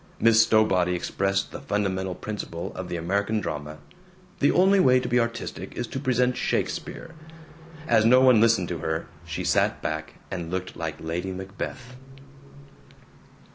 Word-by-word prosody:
Miss 115 0 +6
Stowbody 110 -6 +3
expressed 95 +2 -1
the - - -8
fundamental 95 -6 -1
principle 100 -5 -6
of 95 -1 -6
the - - -3
American 100 +6 0
drama: 75 -4 -5 0.6
the 140 - +4
only 195 +2 +4
way 130 -6 +5
to 125 - -4
be 120 0 +2
artistic 115 0 -4
is 120 - -1
to 135 - -5
present 125 -2 +1
Shakespeare. 160 - -3 0.7
As 115 -2 +4
no 125 +3 +6
one 130 -4 +6
listened 110 -6 +3
to 85 - -3
her 80 0 -2 0.2
she - - -4
sat - - +2
back 80 0 -4 0.2
and 85 -3 -4
looked 95 +1 -4
like 80 -2 -4
Lady 85 +4 -3
Macbeth. 95 +7 -7
100 Hz, 150 wpm, -25 LUFS, 90-120 Hz, 0.7 s, Miss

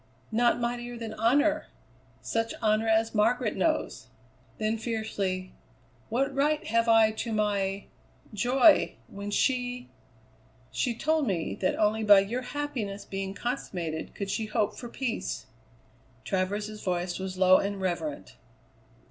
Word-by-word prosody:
"Not 240 +2 +3
mightier 240 0 -3
than 225 -2 -6
honour 285 +8 +2 0.6
such 225 0 -1
honour 220 0 +1
as 225 0 +2
Margaret 225 +1 +2
knows!" 315 -1 -1 0.5
Then 220 +1 -1
fiercely: 205 -5 -3 0.6
"What 255 +5 0
right 295 +2 +1
have 230 +1 +2
I 225 -1 +6
to 225 +1 -4
my 200 -2 0 0.5
joy, 255 +8 +4
when 200 +1 -7
she 245 +2 0 0.4
" - - -32
"She 245 -3 -1
told 310 +2 +1
me 175 -5 -1
that 185 - +1
only 215 +1 +2
by 205 -2 +8
your 230 +6 -3
happiness 250 -7 -4
being 195 0 -4
consummated 175 - -4
could 200 -1 -3
she 220 +2 -2
hope 215 -1 0
for 240 - -8
peace." 245 -1 -3 0.8
Travers's 205 +2 -2
voice 180 -1 -2
was 190 -1 -5
low 185 0 +6
and 200 0 -2
reverent. 155 - -3
220 Hz, 130 wpm, -28 LUFS, 195-245 Hz, 0.8 s, by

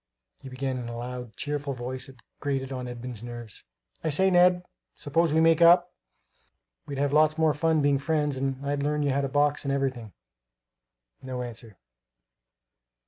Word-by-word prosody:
He 135 - -10
began 130 0 -3
in 120 -1 -6
a 120 - -6
loud, 125 -2 -6
cheerful 145 -1 -3
voice 130 +1 -5
that 130 -3 -16 0.2
grated 135 -2 -2
on 130 -1 -4
Edmund's 120 -2 -7
nerves. 120 -3 -9 0.4
"I 160 - 0
say, 190 +6 +3
Ned, 180 0 +5 0.3
s'pose 165 +3 +1
we 160 - +3
make 165 0 +4
up! 175 +1 +6 0.9
we'd 140 - -5
have 140 0 0
lots 155 +1 +4
more 160 -1 +3
fun 160 0 +1
being 140 -1 +3
friends; 150 0 0
and 135 +1 -3
I'll 145 0 -1
learn 150 +1 0
you 140 - +1
how 140 +1 +1
to 140 - -2
box 145 +1 +1
and 140 - -1
everything." 130 -7 -2 1.1
No 130 -1 -4
answer. 115 -4 -9
140 Hz, 170 wpm, -27 LUFS, 125-150 Hz, 1.1 s, up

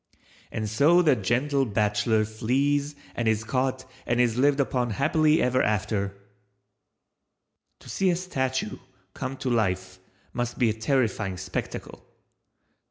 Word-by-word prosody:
And 110 -1 -3
so 150 - +4
the 150 -5 +4
gentle 130 +7 +1
bachelor 105 -1 +1
flees 140 +7 0 0.2
and 120 - -2
is 110 -1 +1
caught 130 +2 -1 0.2
and 120 0 +1
is 120 -2 +3
lived 140 +3 +3
upon 125 -3 0
happily 155 +6 +2
ever 125 +1 +2
after⸺ 100 -1 -1 1.7
To - - -15
see 195 -1 +1
a 175 - +2
statue 130 -8 -2 0.3
come 130 +1 -5
to 130 - -3
life 95 -4 -1 0.3
must 120 -1 -3
be 120 -3 +3
a - - -2
terrifying 110 -5 0
spectacle. 90 0 -6
120 Hz, 130 wpm, -26 LUFS, 110-140 Hz, 1.7 s, so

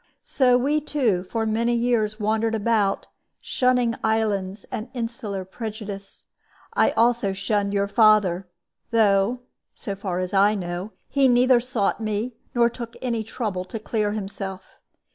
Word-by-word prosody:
So 250 -2 +3
we 290 +5 +1
two 250 -11 +1
for 225 +4 -3
many 230 +2 +1
years 230 -3 +1
wandered 220 +1 +1
about, 210 -2 +1 0.3
shunning 250 -2 +1
islands 210 -3 0
and 220 - -4
insular 230 -5 -4
prejudice. 205 -1 -7 0.5
I - - +4
also 235 -4 +2
shunned 200 +1 0
your 200 0 +1
father, 200 -4 +4 0.4
though 220 +1 +3 0.3
(so 200 -5 -5
far 190 -2 -3
as 185 +1 -3
I 200 +2 +4
know) 180 +1 -4 0.2
he 275 -1 +3
neither 250 0 +5
sought 230 -3 -1
me 215 +3 -2 0.2
nor 235 -1 +5
took 235 0 -7
any 235 -3 -1
trouble 215 -5 -3
to 205 - -6
clear 215 -1 -1
himself. 195 -2 -6
220 Hz, 140 wpm, -24 LUFS, 200-235 Hz, 0.5 s, neither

